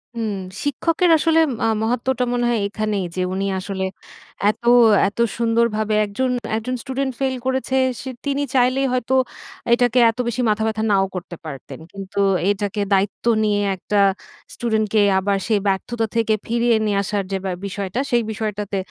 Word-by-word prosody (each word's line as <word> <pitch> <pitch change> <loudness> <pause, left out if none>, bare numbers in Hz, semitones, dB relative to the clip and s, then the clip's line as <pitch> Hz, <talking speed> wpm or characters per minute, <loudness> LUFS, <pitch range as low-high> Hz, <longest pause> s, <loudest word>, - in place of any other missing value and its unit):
হুম। 225 -3 -2 0.3
শিক্ষকের 330 +5 +1
আসলে 325 +1 +3 0.2
মা - - 0 0.2
মহত্ত্বটা 245 +2 0
মনে 245 0 0
হয় 235 -2 +1
এখানেই 210 -2 -2
যে 185 - -1
উনি 195 +1 -1
আসলে 190 0 -4 0.7
এত, 215 +3 -3 0.5
এত 200 - -7 0.2
সুন্দরভাবে 230 -2 +1
একজন 225 +6 -2 0.3
একজন 240 +3 -2
স্টুডেন্ট 265 0 -2
ফেইল 265 -1 0
করেছে 260 0 -1 0.3
সে 260 - -6 0.2
তিনি 280 0 0
চাইলেই 255 +2 +3
হয়তো 255 0 -1 0.6
এটাকে 245 0 +3
এত 225 - -4
বেশি 235 +1 -1
মাথা 215 +1 +1
ব্যথা 220 0 -2
নাও 195 -1 +3
করতে 175 -1 -6
পারতেন। 140 -4 -8
কিন্তু 195 0 -6 0.3
এইটাকে 205 0 -1
দায়িত্ব 195 +3 0 0.2
নিয়ে, 205 -1 +1 0.2
একটা 205 +3 -2 0.6
স্টুডেন্টকে 220 -2 0 0.2
আবার 200 +1 0
সেই 215 -2 +2
ব্যর্থতা 225 +4 -1
থেকে 225 -1 +2
ফিরিয়ে 235 0 +2
নিয়ে 205 -2 +1
আসার 200 0 -1
যে 195 - 0
ব্য 190 - -1
বিষয়টা, 200 +3 -3
সেই 240 -1 +3
বিষয়টাতে 210 -2 -3
220 Hz, 155 wpm, -21 LUFS, 200-250 Hz, 0.7 s, আসলে